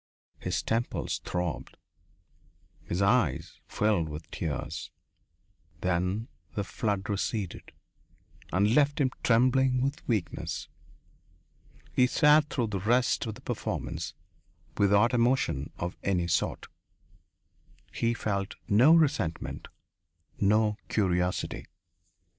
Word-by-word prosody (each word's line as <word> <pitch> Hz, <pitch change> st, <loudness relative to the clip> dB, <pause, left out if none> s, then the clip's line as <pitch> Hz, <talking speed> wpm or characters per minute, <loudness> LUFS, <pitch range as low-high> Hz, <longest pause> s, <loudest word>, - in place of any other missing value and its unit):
His -, -, -2 dB
temples 115 Hz, +2 st, -1 dB
throbbed. 90 Hz, -7 st, -3 dB, 1.1 s
His 90 Hz, +3 st, -1 dB
eyes 100 Hz, -, +1 dB
filled 100 Hz, -7 st, +1 dB
with 75 Hz, +1 st, -8 dB
tears. 75 Hz, -3 st, -4 dB, 0.9 s
Then 90 Hz, +5 st, 0 dB, 0.3 s
the 100 Hz, -, 0 dB
flood 100 Hz, -1 st, -2 dB
receded 100 Hz, -2 st, -3 dB, 0.8 s
and 100 Hz, +4 st, +3 dB
left 145 Hz, +1 st, +3 dB
him 130 Hz, -3 st, +2 dB
trembling 130 Hz, +2 st, +3 dB
with 140 Hz, +3 st, -1 dB
weakness. 105 Hz, -8 st, -2 dB, 1.3 s
He 125 Hz, -, +4 dB
sat 150 Hz, +2 st, +5 dB
through 120 Hz, -6 st, -1 dB
the 100 Hz, -, 0 dB
rest 120 Hz, +4 st, +2 dB
of 110 Hz, -, -4 dB
the 130 Hz, -, -13 dB
performance 125 Hz, -4 st, -4 dB, 0.6 s
without 100 Hz, +4 st, +4 dB
emotion 120 Hz, -, +1 dB
of 85 Hz, +2 st, -4 dB
any 90 Hz, -3 st, +1 dB
sort. 85 Hz, -, 0 dB, 1.3 s
He 115 Hz, 0 st, 0 dB
felt 100 Hz, -3 st, -2 dB
no 125 Hz, +11 st, +6 dB
resentment, 140 Hz, -, 0 dB, 0.7 s
no 105 Hz, +1 st, +3 dB
curiosity. 90 Hz, -3 st, 0 dB
105 Hz, 100 wpm, -29 LUFS, 95-125 Hz, 1.3 s, no